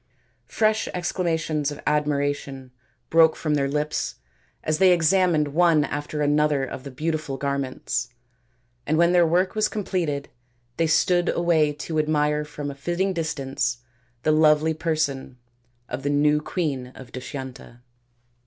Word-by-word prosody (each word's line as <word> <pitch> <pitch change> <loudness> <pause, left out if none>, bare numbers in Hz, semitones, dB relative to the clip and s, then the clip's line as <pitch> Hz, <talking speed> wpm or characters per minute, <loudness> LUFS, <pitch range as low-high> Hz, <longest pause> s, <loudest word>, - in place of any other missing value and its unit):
Fresh 215 0 +1
exclamations 160 -4 -1
of 145 - -7
admiration 145 -3 -1 0.4
broke 165 -1 +6
from 155 -2 -1
their 140 -2 +1
lips 150 +1 -2 0.5
as 155 0 0
they 190 -1 +6
examined 170 -2 +3
one 165 0 +4
after 145 +1 -3
another 145 -1 +2
of 130 - -7
the 140 - -7
beautiful 155 0 -3
garments, 135 -3 -2 0.8
and 155 +2 +2
when 170 +1 +4
their 175 -2 +4
work 180 +3 +2
was 215 0 +2
completed 170 -9 -2 0.5
they 165 - +2
stood 175 +2 +2
away 165 -3 +2
to 155 +2 -3
admire 150 -1 +1
from 150 -1 -6
a - - -7
fitting 175 +7 -1
distance 135 -7 -2 0.5
the 155 - +3
lovely 155 0 +4
person 155 -5 -2 0.5
of 125 +2 -5
the 140 - -1
new 150 +1 +3
queen 150 -7 -2
of 125 -2 -12
Dushyanta. 130 -2 -8
150 Hz, 135 wpm, -24 LUFS, 140-165 Hz, 0.8 s, broke